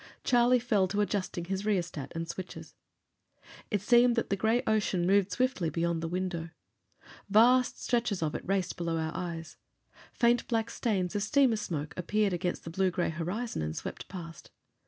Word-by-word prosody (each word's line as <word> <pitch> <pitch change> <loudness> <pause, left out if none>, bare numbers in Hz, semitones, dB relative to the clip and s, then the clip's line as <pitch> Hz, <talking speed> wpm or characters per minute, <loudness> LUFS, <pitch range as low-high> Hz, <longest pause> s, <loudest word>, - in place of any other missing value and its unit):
Charlie 245 0 +4
fell 220 -6 +2
to 205 +3 0
adjusting 195 -4 -2
his 195 +2 -3
rheostat 175 -9 -2
and 165 0 -3
switches. 185 +2 -7 1.0
It 205 -3 0
seemed 240 +2 +5
that 235 - -1
the - - +3
gray 220 +5 +1
ocean 205 -5 +1
moved 195 +1 +3
swiftly 250 -6 0
beyond 165 +1 -1
the 165 - -2
window. 175 -1 -3 0.8
Vast 245 +5 +5
stretches 230 -7 0
of 150 - -1
it - - -3
raced 190 -2 -1
below 170 -1 -1
our 160 -1 -2
eyes. 170 -3 -5 0.5
Faint 240 0 +2
black 225 -1 0
stains 195 -5 -1
of 205 - 0
steamer 245 +3 +3
smoke 155 -8 -4
appeared 205 +2 +1
against 175 0 -2
the 165 - -7
blue 190 +2 +2
gray 175 0 -1
horizon 180 - -3
and 75 0 -3
swept - - -6
past. 170 -3 -9
190 Hz, 170 wpm, -30 LUFS, 170-220 Hz, 1.0 s, seemed